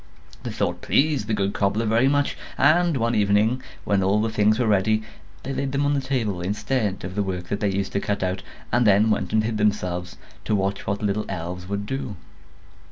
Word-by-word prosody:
The - - -5
thought - - -2
pleased 140 -7 +2
the 110 - +1
good 100 0 0
cobbler 100 +3 0
very 115 +4 +3
much; 145 +1 +1 0.2
and 160 +3 +4
one 115 0 +1
evening, 105 +4 +2 0.2
when 100 -1 +1
all 95 +2 +2
the 110 +1 0
things 110 0 +3
were 125 - +1
ready, 110 +1 +2 0.4
they 135 - -4
laid 135 0 -2
them 140 +1 +1
on 145 - +2
the 140 - +1
table, 120 -9 -1
instead 105 +2 -1
of 90 +1 -5
the 105 - 0
work 90 -2 -4
that 100 - -1
they 105 - +1
used 95 0 -2
to 100 - 0
cut 100 -1 -2
out, 95 0 -1 0.3
and 120 0 +3
then 105 +2 +5
went 95 -3 -1
and 110 0 +3
hid 110 0 -1
themselves, 90 -4 -1 0.3
to 110 - +1
watch 100 0 -1
what 100 - 0
the - - -1
little 105 +1 0
elves 90 0 -5
would 100 0 -2
do. 130 -3 -4
105 Hz, 220 wpm, -24 LUFS, 100-120 Hz, 0.4 s, then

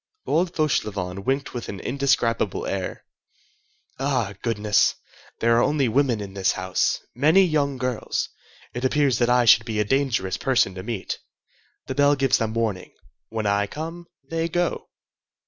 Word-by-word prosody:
Old 175 +2 0
Fauchelevent 100 - -1
winked 135 +1 -1
with 120 - -5
an 100 - -6
indescribable 125 -5 0
air. 95 -1 -4 0.9
"Ah, 130 -7 0
goodness! 105 -3 +2 0.4
there 115 0 +3
are 120 - +4
only 145 -2 +2
women 125 -1 +2
in 100 -1 -7
this 95 -1 +1
house—many 155 +9 +2
young 145 -6 +1
girls. 125 -2 -2 0.4
It 125 - -5
appears 135 -2 +2
that 120 -1 +2
I 125 0 +4
should 115 0 +7
be 110 -2 -3
a 105 - +2
dangerous 130 -7 0
person 125 -7 +2
to 95 - -6
meet. 110 -1 -4 0.7
The - - -4
bell 145 +1 +4
gives 135 -2 +2
them 110 0 -2
warning. 110 -5 -2 0.3
When 110 -1 -3
I 100 0 +1
come, 165 +5 -7 0.2
they 165 +2 -2
go." 175 +1 -1
125 Hz, 150 wpm, -24 LUFS, 105-140 Hz, 0.9 s, should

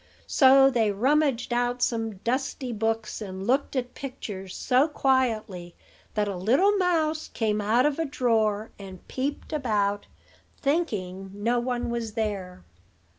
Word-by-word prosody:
So 270 -1 +6
they 225 -4 +2
rummaged 260 +3 +1
out 245 0 0
some 225 -3 -1
dusty 255 +4 -2
books, 225 0 -2
and 190 -2 -6
looked 270 +5 +1
at 250 -1 -2
pictures 205 -8 -7
so 255 +4 +3
quietly 225 - 0 0.4
that 210 -1 +1
a 200 - -3
little 270 - +3
mouse 320 -4 +1
came 215 -2 -1
out 225 +5 +3
of 295 +1 0
a 325 - +1
drawer 225 -6 0
and 190 -2 -11
peeped 280 +4 -4
about, 205 -8 0 0.5
thinking 205 - -2
no 230 +4 +1
one 245 -1 -2
was 230 -2 -3
there. 200 - -3
235 Hz, 135 wpm, -26 LUFS, 210-270 Hz, 0.5 s, So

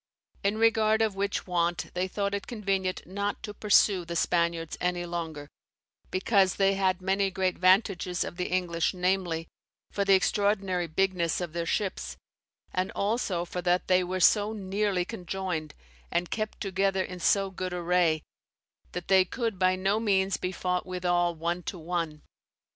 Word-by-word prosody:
In 200 +2 +1
regard 220 -1 +3
of 220 -2 0
which 200 +1 -2
want 175 -1 -1
they 180 +1 -1
thought 200 +1 -2
it 200 - -3
convenient 195 -5 -2
not 200 +2 -3
to 210 - -5
pursue 205 -3 +3
the 170 0 -6
Spaniards 170 -1 0
any 180 -1 0
longer, 165 -4 -5 0.6
because 190 0 +2
they 195 0 +3
had 190 -1 0
many 195 +1 +1
great 185 -1 -1
vantages 185 -1 +3
of - - -6
the 180 - -1
English, 175 -1 0
namely, 180 -3 0 0.4
for 200 - 0
the 195 -1 +5
extraordinary 195 -2 +1
bigness 175 0 0
of 175 -3 -4
their 170 -1 -2
ships, 195 +1 -2 0.6
and 185 +1 0
also 200 -4 -1
for 180 +1 -5
that 180 0 +1
they 185 0 +4
were 185 +1 -3
so 210 +3 +4
neerley 195 -2 -1
conjoyned, 180 -6 -4 0.4
and 175 +1 -1
kept 215 -1 -3
together 195 -1 0
in 180 -1 -7
so 195 +3 +2
good 185 -1 -4
array, 175 -3 +1 0.7
that 180 -1 -5
they 190 -1 +6
could 225 +1 -3
by 185 0 +3
no 195 +3 +1
meanes 195 -3 +2
be 180 - -3
fought 180 -1 -2
withall 175 -1 0
one 170 +2 -2
to 180 - -5
one. 165 -2 -3
185 Hz, 160 wpm, -28 LUFS, 175-195 Hz, 0.7 s, they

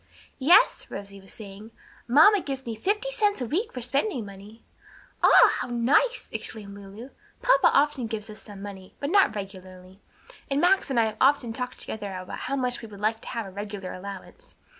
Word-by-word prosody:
"Yes," 340 - +5
Rosie 200 -1 -8
was 195 - -14
saying, 205 0 -11 0.4
"mamma 320 - +6
gives 270 -3 -5
me 230 - -4
fifty 420 - -1
cents 415 - +1
a 250 - -2
week 360 - -2
for 250 - -6
spending 255 - -1
money." 200 +3 -13 0.6
"Ah, - - +7
how - - -3
nice!" 250 - +1
exclaimed 205 -3 -6
Lulu. 200 +6 -11 0.3
"Papa - - +5
often 280 -4 +2
gives 220 -1 -5
us 215 -1 -10
some 200 -1 -11
money, 190 -2 -10
but 285 +2 -3
not 390 - +4
regularly, 185 -1 -9 0.5
and 275 0 +1
Max 365 +2 +3
and 260 -3 +1
I 225 - +4
have 215 -1 -4
often 265 -5 +3
talked 250 +1 -5
together 205 -2 -5
about 185 0 -7
how 275 - -3
much 250 -2 -1
we 225 - -8
would 205 -2 -12
like 220 +2 0
to - - -13
have 230 -3 -4
a 195 - -9
regular 200 -1 -6
allowance. 200 - -10
225 Hz, 190 wpm, -26 LUFS, 200-275 Hz, 0.6 s, Ah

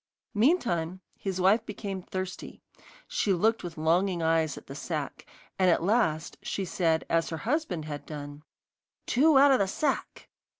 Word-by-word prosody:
Meantime 205 - +1 0.2
his 190 -2 -4
wife 200 +5 +4
became 200 -3 -5
thirsty. 185 0 -6 0.4
She 480 - +1
looked 220 +6 +1
with 170 -2 -7
longing 170 +3 +1
eyes 160 -2 +1
at - - -11
the 135 - -9
sack, 150 0 -5 0.3
and 185 -1 +5
at 170 - +3
last 170 -6 +1
she 195 - -3
said, 165 -2 0
as 165 0 +1
her 160 - -4
husband 225 - -2
had 145 -1 -7
done: 145 -1 -7 0.6
'Two 290 +3 +4
out 280 +1 +7
of 265 - +4
the 195 - +2
sack. 295 +10 -2
185 Hz, 160 wpm, -28 LUFS, 160-220 Hz, 0.6 s, out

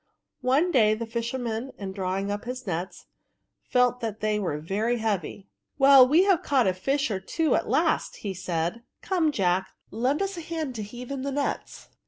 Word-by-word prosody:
One 275 +8 +2
day 215 -6 +4
the 230 +1 -4
fisher 235 +3 -3
man, 240 +1 -4
in 195 -2 -5
drawing 190 +1 -2
up 205 +2 -4
his 250 +1 -5
nets, 180 0 -4 0.6
felt 250 0 +2
that 225 -3 -4
they 215 0 0
were 170 -7 -2
heavy. 205 +1 -2 0.2
" - - -54
Well, 270 -2 +8
we 315 +7 +5
have 385 -4 +3
caught 265 -4 +2
a 185 - +2
fish 270 +8 -1
or 195 - -1
two 315 - 0
at - - 0
last," - - +1
said - - -15
he. 200 -2 -2 0.5
*^ - - -28 0.2
Come, 340 -5 +1
Jack, 190 -5 +1 0.2
lend 255 - 0
us 390 -1 -4
a - - -4
hand 320 -4 -4
to 225 - -5
heave 240 +5 -8
in 275 -1 -3
the 280 +1 -3
nets.' 280 +1 -3
235 Hz, 200 wpm, -26 LUFS, 205-275 Hz, 0.6 s, Well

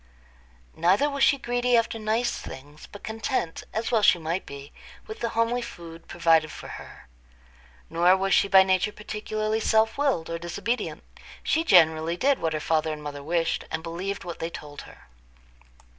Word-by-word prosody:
Neither 190 - +3
was 280 -1 0
she 280 - +5
greedy 245 -1 +1
after 230 0 0
nice 220 +3 0
things, 145 +3 -11
but 205 - -11
content, 220 -5 -3
as 225 +3 -2
well 225 -3 +3
she 190 - +5
might 165 +3 -3
be, 140 0 -9 0.3
with 435 - -8
the 235 - -1
homely 230 +2 +1
food 170 -8 -10
provided 165 -2 +2
for - - -9
her. - - -11 0.8
Nor 175 +3 +4
was 195 0 0
she - - +4
by 190 -1 +7
nature 190 +2 +1
particularly 215 +1 -3
self 220 +2 +2
willed 270 - +1
or 165 0 -4
disobedient; 230 +8 -3 0.4
she 320 - +1
generally 165 - +4
did 275 +4 +2
what 160 -1 -1
her 155 - -1
father 160 0 0
and 150 -1 -6
mother 145 -1 -6
wished, 165 +2 -1
and 160 0 -4
believed 185 +4 -4
what 175 -1 -7
they 165 - -3
told 145 -3 -9
her. - - -17
190 Hz, 175 wpm, -26 LUFS, 165-225 Hz, 0.8 s, by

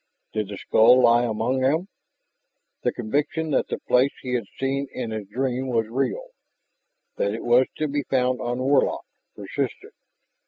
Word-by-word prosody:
Did 110 -2 -1
the 100 0 -7
skull 125 +6 +5
lie 120 +1 +5
among 115 +3 -1
them? 155 +8 +1 0.9
The - - +1
conviction 145 +7 -2
that - - +1
the - - -3
place 125 +2 +2
he 125 -1 -3
had 120 -3 -1
seen 135 +1 -1
in 120 -3 -5
his 110 -2 -5
dream 130 +4 -2
was 115 -3 +1
real, 435 - -2 0.9
that 100 +1 0
it 115 - -6
was 120 +2 +4
to 155 - 0
be 145 0 -1
found 125 -1 +1
on 120 0 -2
Warlock, 135 +2 +1 0.3
persisted. - - -4
125 Hz, 160 wpm, -24 LUFS, 115-135 Hz, 0.9 s, skull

